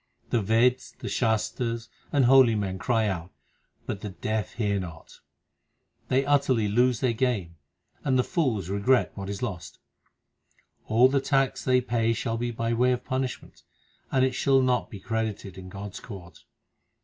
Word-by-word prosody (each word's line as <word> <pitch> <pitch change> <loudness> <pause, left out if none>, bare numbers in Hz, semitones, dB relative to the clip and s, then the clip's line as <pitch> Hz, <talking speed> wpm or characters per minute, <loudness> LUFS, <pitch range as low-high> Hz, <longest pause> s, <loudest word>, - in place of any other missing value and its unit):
The 115 - +2
Veds, 115 +5 +2
the - - -7
Shastars, 115 0 -1 0.2
and 140 -3 +3
holy 130 -3 +6
men 95 -3 -2
cry 115 +2 +1
out, 85 -3 -3 0.6
but 100 - -4
the 105 - -5
deaf 110 +2 -3
hear 100 -3 0
not. 85 -3 -9 0.9
They 135 +1 +2
utterly 140 -6 +2
lose 120 +3 +2
their 125 -3 +2
game, 110 -9 -1 0.5
and 130 -2 +2
the 125 - +3
fools 125 - -1
regret 100 +6 +2
what 100 -1 -6
is 100 +3 -5
lost. 100 -8 -5 1.1
All 115 +3 +5
the 135 +1 +1
tax 135 -1 +1
they 125 -1 +3
pay 115 -2 +1
shall 115 0 -2
be 120 +1 -2
by 115 0 -2
way 125 +2 +3
of 125 0 -4
punishment, 130 -1 -4 0.5
and 130 -1 +3
it 130 - 0
shall 135 0 +3
not 125 -7 +1
be 100 - -9
credited 110 -3 -3
in 95 -1 -9
God 100 +1 -7
s - - -8
court. 95 -7 -11
115 Hz, 165 wpm, -26 LUFS, 100-130 Hz, 1.1 s, holy